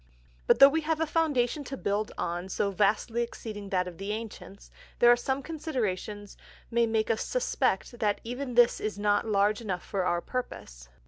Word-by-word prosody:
But - - +5
though 275 - +10
we 320 +3 +1
have 315 0 -1
a 320 - +2
Foundation 295 -4 0
to 270 +2 -6
build 205 0 -1
on 175 +2 -3
so 200 +1 -1
vastly 210 +4 +1
exceeding 215 -3 -6
that 180 -1 0
of 175 -1 -9
the 200 +2 -3
Ancients, 215 -2 -8 0.3
there 240 0 +7
are - - +7
some 265 +3 -2
Considerations 215 - -4 0.3
may 235 0 +3
make 220 0 +1
us 220 - -1
suspect - - -1
that 205 -2 +1
even 250 +2 -5
this 240 0 +5
is 215 -1 -3
not 205 +1 +1
large 205 +1 +2
enough 190 -5 -4
for 195 -2 -2
our 175 -1 +1
purpose. 60 - -6
220 Hz, 185 wpm, -28 LUFS, 200-250 Hz, 0.3 s, though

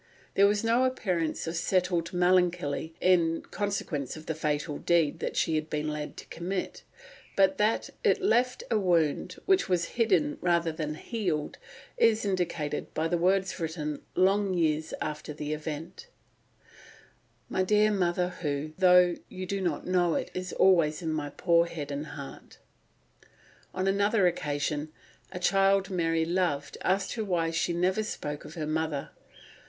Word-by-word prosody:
There 200 +1 +5
was 205 +1 +1
no 230 +3 +3
appearance 180 -11 -1
of 165 +1 -4
settled 175 0 0
melancholy 175 -4 +1
in 170 -3 +3
consequence 180 -9 -3
of 155 - -11
the 160 - -2
fatal 150 -1 -2
deed 165 -4 +1 0.2
she 165 - +1
had 155 0 -1
been 150 0 -2
led 150 0 -5
to - - -9
commit, 180 +2 -4 0.5
but 190 -1 +3
that 215 +2 +1
it - - +3
left 250 - +1
a 220 - +3
wound 175 -2 +1
which 380 - +3
was 175 -2 +1
hidden 295 +6 +2
rather 170 -2 +2
than 155 -1 -4
healed 175 -6 -3 0.4
is 225 - +3
indicated 175 -6 -2
by 160 +1 +1
the 175 +1 0
words 190 +2 +1
written 155 -3 -3
long 195 +1 +3
years 155 -2 0
after 150 0 -5
the 150 0 -4
event: 155 - -6 1.4
"My 185 - -1
dear 210 +3 +3
mother 180 -2 +1
who, 145 -1 -2
though 180 -2 +6
you 185 0 -6
do 195 +1 -3
not 170 -6 -2
know 175 -2 +2
it, - - -2
is 185 0 -4
always 170 -4 +3
in 160 -1 -1
my 150 -2 -2
poor 170 +3 +2
head 150 -4 -6
and 145 +2 -4
heart." 140 -2 -10 1.1
On 185 0 -2
another 200 +1 +3
occasion, 150 -2 -1 0.4
a - - -6
child 195 +1 +3
Mary 165 -2 +1
loved 165 -5 -1
asked 190 +1 0
her 225 - -2
why 170 -5 0
she 165 +2 0
never 180 +4 +1
spoke 150 -8 -5
of 155 - -10
her 155 -3 -3
mother. 155 -2 -2
175 Hz, 155 wpm, -28 LUFS, 155-190 Hz, 1.4 s, though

